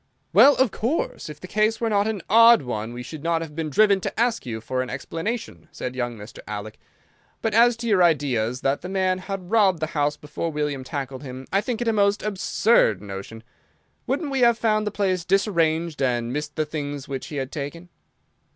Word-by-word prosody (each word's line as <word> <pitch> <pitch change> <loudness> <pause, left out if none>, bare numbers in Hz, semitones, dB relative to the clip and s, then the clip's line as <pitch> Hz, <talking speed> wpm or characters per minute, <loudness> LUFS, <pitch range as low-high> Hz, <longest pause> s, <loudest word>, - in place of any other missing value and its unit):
"Well, 285 - +8
of 260 -5 +2
course, 240 - -2
if 150 - -9
the 185 - -9
case 215 +3 +1
were 230 - 0
not 205 0 +2
an 210 -5 -3
odd 230 0 +7
one 110 -2 -4
we 120 +1 -7
should 155 +4 -8
not 165 0 0
have 150 -2 -10
been 160 -1 -3
driven 200 +5 +4
to - - -4
ask 235 - +1
you 110 -2 -4
for 130 +3 -2
an 130 - -4
explanation," 165 - -5
said 125 0 -5
young 120 -2 -3
Mr. 105 +2 -11
Alec. 105 0 -6 0.6
"But 225 - 0
as 235 +1 +5
to 235 0 -5
your 200 -5 +3
ideas 130 -7 +1
that 135 +1 0
the 180 - -6
man 185 -1 0
had 190 -1 -6
robbed 200 -6 +4
the 155 - 0
house 150 -1 0
before 150 +3 -4
William 150 -3 -2
tackled 135 -1 -5
him, 130 -2 -8
I 195 - +3
think 240 +1 -3
it 240 - -1
a 225 - +3
most 200 0 +2
absurd 205 - +2
notion. 100 +3 -8 0.6
Wouldn't 285 +3 -1
we 270 - 0
have 235 -2 +5
found 215 -1 +1
the - - -1
place 190 -4 0
disarranged, 170 -5 +1
and 120 -2 0
missed 150 +1 -4
the 155 - 0
things 145 -2 -5
which 135 +1 -5
he 155 - -7
had 135 -1 -3
taken?" 160 +4 -6
165 Hz, 210 wpm, -24 LUFS, 135-210 Hz, 0.6 s, Well